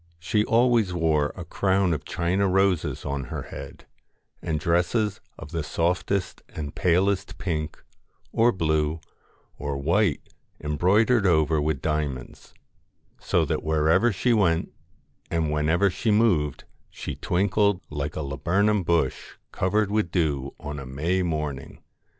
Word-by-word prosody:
She 95 Hz, +6 st, 0 dB
always 115 Hz, -5 st, +3 dB
wore 80 Hz, -3 st, +1 dB
a 90 Hz, -, -7 dB
crown 95 Hz, +1 st, +1 dB
of 75 Hz, -, -4 dB
China 90 Hz, +3 st, 0 dB
roses 95 Hz, -3 st, +1 dB
on 70 Hz, -1 st, -3 dB
her -, -, -5 dB
head, -, -, -10 dB, 0.6 s
and 80 Hz, -2 st, -2 dB
dresses 90 Hz, +6 st, 0 dB, 0.2 s
of 75 Hz, -, -10 dB
the 85 Hz, -2 st, -2 dB
softest 90 Hz, +5 st, -1 dB
and 75 Hz, -1 st, -6 dB
palest 95 Hz, +4 st, +1 dB
pink, 80 Hz, -3 st, -4 dB, 0.5 s
or 115 Hz, +2 st, +4 dB
blue, 80 Hz, -3 st, 0 dB, 0.6 s
or 70 Hz, -1 st, -3 dB
white 85 Hz, +9 st, +1 dB, 0.3 s
embroidered 100 Hz, -, +2 dB
over 80 Hz, -2 st, +3 dB
with 75 Hz, -2 st, -1 dB
diamonds; 75 Hz, -5 st, -3 dB, 0.6 s
so -, -, +1 dB
that -, -, -1 dB
wherever 80 Hz, +9 st, +3 dB
she 110 Hz, +6 st, +1 dB
went 85 Hz, -7 st, +2 dB, 0.6 s
and 80 Hz, -3 st, 0 dB
whenever 80 Hz, +6 st, +2 dB
she 110 Hz, -, -2 dB
moved 95 Hz, -, +2 dB, 0.3 s
she -, -, -6 dB
twinkled 100 Hz, +1 st, +1 dB
like 75 Hz, -1 st, -3 dB
a 80 Hz, -, -3 dB
laburnum 90 Hz, +10 st, +1 dB
bush 85 Hz, -6 st, 0 dB, 0.2 s
covered 100 Hz, +2 st, 0 dB
with 105 Hz, -4 st, +1 dB
dew 75 Hz, -6 st, -1 dB
on 75 Hz, 0 st, -6 dB
a 70 Hz, -, -7 dB
May 80 Hz, +8 st, -1 dB
morning. 75 Hz, -6 st, -3 dB
85 Hz, 130 wpm, -25 LUFS, 75-100 Hz, 0.6 s, or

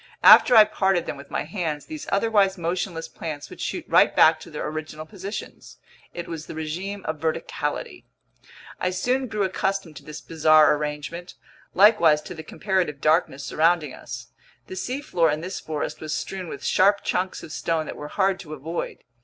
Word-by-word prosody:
After 245 Hz, -, +9 dB
I 220 Hz, -, +11 dB
parted 190 Hz, -4 st, 0 dB
them -, -, -4 dB
with 140 Hz, 0 st, -12 dB
my -, -, -2 dB
hands, 160 Hz, -3 st, -4 dB
these 310 Hz, -1 st, -8 dB
otherwise 200 Hz, -2 st, +2 dB
motionless 170 Hz, 0 st, -3 dB
plants 150 Hz, -3 st, -7 dB
would -, -, -10 dB
shoot -, -, -3 dB
right -, -, +4 dB
back -, -, +6 dB
to -, -, -12 dB
their -, -, -5 dB
original 155 Hz, 0 st, -6 dB
positions. 200 Hz, +3 st, -8 dB, 0.3 s
It 175 Hz, -, -7 dB
was 165 Hz, -2 st, -6 dB
the -, -, -8 dB
regime 180 Hz, +6 st, -5 dB
of 155 Hz, -1 st, -3 dB
verticality. 160 Hz, +1 st, -3 dB, 0.7 s
I 180 Hz, -, 0 dB
soon 250 Hz, +8 st, 0 dB
grew 215 Hz, -3 st, -1 dB
accustomed 190 Hz, -3 st, -2 dB
to -, -, -11 dB
this 150 Hz, 0 st, -8 dB
bizarre 155 Hz, -1 st, +4 dB
arrangement, 150 Hz, +4 st, -5 dB, 0.4 s
likewise 170 Hz, -7 st, +5 dB
to -, -, -8 dB
the 160 Hz, -, -8 dB
comparative 180 Hz, -3 st, -2 dB
darkness 155 Hz, -2 st, +1 dB
surrounding 160 Hz, -2 st, +1 dB
us. -, -, -9 dB, 0.4 s
The -, -, -8 dB
seafloor 215 Hz, -, 0 dB
in 150 Hz, +1 st, -2 dB
this 185 Hz, +3 st, -5 dB
forest 155 Hz, -2 st, -4 dB
was 155 Hz, -1 st, -3 dB
strewn 190 Hz, -2 st, -5 dB
with 140 Hz, -, -7 dB
sharp 200 Hz, +2 st, +3 dB
chunks 185 Hz, +1 st, -2 dB
of 155 Hz, -, -9 dB
stone 160 Hz, 0 st, -1 dB
that -, -, -7 dB
were 150 Hz, -, -7 dB
hard 190 Hz, +2 st, +1 dB
to 155 Hz, -5 st, -8 dB
avoid. 160 Hz, +4 st, -5 dB
170 Hz, 180 wpm, -24 LUFS, 155-195 Hz, 0.7 s, I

